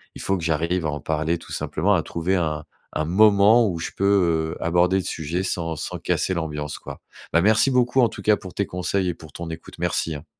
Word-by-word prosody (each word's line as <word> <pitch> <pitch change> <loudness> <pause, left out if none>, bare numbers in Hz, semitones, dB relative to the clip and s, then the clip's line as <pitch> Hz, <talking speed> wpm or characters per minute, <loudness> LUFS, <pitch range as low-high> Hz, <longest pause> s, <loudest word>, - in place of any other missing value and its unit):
il - - -8
faut 95 0 0
que 85 - -7
j'arrive 85 +2 0
à - - 0
en 75 -1 -5
parler 80 +2 -1
tout - - -14
simplement, 95 +7 0
à 85 - 0
trouver 85 +3 -1
un 80 -4 -1 0.3
un 75 - -1
moment 105 +5 +5
où 85 - -3
je 80 - -4
peux, 85 -5 +2
heu, - - -9
aborder 90 +3 +3
le 95 - -1
sujet 80 +4 -3
sans 85 -3 -2
sans - - -5
casser 95 - 0
l'ambiance, 75 -3 -4
quoi. - - -9 0.3
Bah, 85 - +5
merci 110 +7 +4
beaucoup 125 0 +2
en 120 - +4
tout - - -9
cas 105 -1 +4
pour 95 - -10
tes 100 - -1
conseils 90 +1 -1
et - - -1
pour 80 -3 -14
ton 85 -1 -6
écoute, 80 0 -9
merci, 80 - -1
hein! 75 +2 -9
85 Hz, 235 wpm, -23 LUFS, 80-95 Hz, 0.3 s, moment